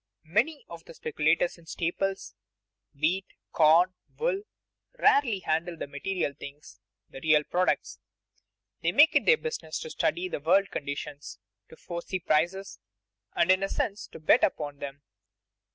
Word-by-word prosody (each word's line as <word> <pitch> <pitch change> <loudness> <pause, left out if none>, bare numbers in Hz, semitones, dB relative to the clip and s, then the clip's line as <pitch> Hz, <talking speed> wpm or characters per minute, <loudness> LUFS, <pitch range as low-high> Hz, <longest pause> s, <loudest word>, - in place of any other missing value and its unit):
_ - - -61 0.2
Many 240 - 0
of 170 -1 -10
the - - -12
speculators 155 +3 0
in 165 - -20
staples, 190 +4 -2 0.7
wheat, 180 +6 +1 0.2
corn, 165 +4 +5 0.2
wool, 460 -4 0 0.6
rarely 235 - +3
handle 165 +1 -1
the - - -4
material 145 +2 -3
things, 140 +2 -12 0.3
the - - -9
real 155 -1 +4
products. 180 +4 -1 0.8
They - - +1
make 305 +3 +6
it - - +3
their 475 - +7
business 470 0 -5
to 470 - -7
study 365 -3 0
the - - -4
world 190 +6 +3
conditions, 145 0 -6 0.3
to - - -13
foresee 175 +3 -5
prices, 175 - 0 0.6
and 170 +2 +4
in 185 +1 +3
a 195 - -1
sense 205 +1 -2
to - - -12
bet 155 - +4
upon 145 -2 -1
them. 140 0 -7
170 Hz, 150 wpm, -28 LUFS, 155-195 Hz, 0.8 s, their